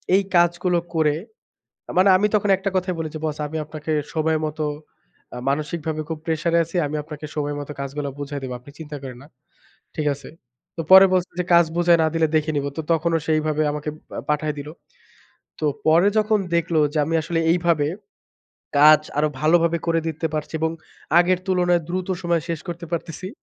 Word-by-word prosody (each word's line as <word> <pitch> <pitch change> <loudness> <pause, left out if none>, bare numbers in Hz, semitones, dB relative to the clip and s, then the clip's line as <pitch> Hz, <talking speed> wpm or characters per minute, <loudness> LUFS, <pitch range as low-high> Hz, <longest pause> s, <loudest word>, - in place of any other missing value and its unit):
এই 200 - +3
কাজগুলো 175 +1 +3 0.2
করে, 155 -2 +2 0.8
মানে, 190 +2 +6
আমি 205 +3 +2
তখন 205 -1 +1
একটা 195 +1 -2
কথাই 185 -1 -1
বলেছি, 155 -1 -4
"বস, 155 -1 -2
আমি 160 +2 -5
আপনাকে 155 0 -6 0.2
সময় 160 0 +1
মত, 155 +1 -8 0.9
মানসিকভাবে 155 +2 -2
খুব 160 -1 -4
প্রেশার 165 +1 -1
এ - - +5
আছি। 165 - -13
আমি 150 - -5
আপনাকে 150 0 -8
সময় 145 -1 -2
মত 145 - -7
কাজগুলা 140 +1 -4
বুঝায় 145 0 -5
দিবো। 130 -1 -4
আপনি 125 +4 -15
চিন্তা 150 -2 -7
করেন 130 -2 -7
না। - - -15 0.7
ঠিক 155 - -1
আছে?" 140 -1 -12 0.5
তো 165 - -2
পরে 190 +1 +10
বলছে 185 -1 0
যে, - - 0
"কাজ 170 0 +7
বুঝায় 175 -1 +4
না 160 - +3
দিলে 165 -1 +3
দেখে 155 0 +1
নিবো।" 140 0 -1
তো - - -1
তখনও 165 +1 +1
সেভাবে 155 -1 +1
আমাকে 150 +1 -4 0.4
পাঠায় 150 0 0
দিল। 145 +1 -7 0.9
তো, 155 - -1 0.2
পরে 165 +5 +5
যখন 215 0 +3 0.2
দেখলো 170 -1 +1
যে - - -1
আমি 165 +2 -1
আসলে 165 +1 -2
এইভাবে, 170 -4 +2 0.9
কাজ 155 +1 +8 0.2
আরো 150 +1 +3
ভালোভাবে 170 +2 +3
করে 165 0 +2
দিতে 160 +1 -2
পারছি 150 +1 -4
এবং 160 0 +1 0.5
আগের 180 +1 +3
তুলনায়, 180 -2 +2
দ্রুত 185 +1 -2
সময়ে 170 -2 +1
শেষ 165 -2 -2
করতে 170 0 -6
পারতেছি। 170 +2 -4
160 Hz, 180 wpm, -22 LUFS, 150-175 Hz, 0.9 s, পরে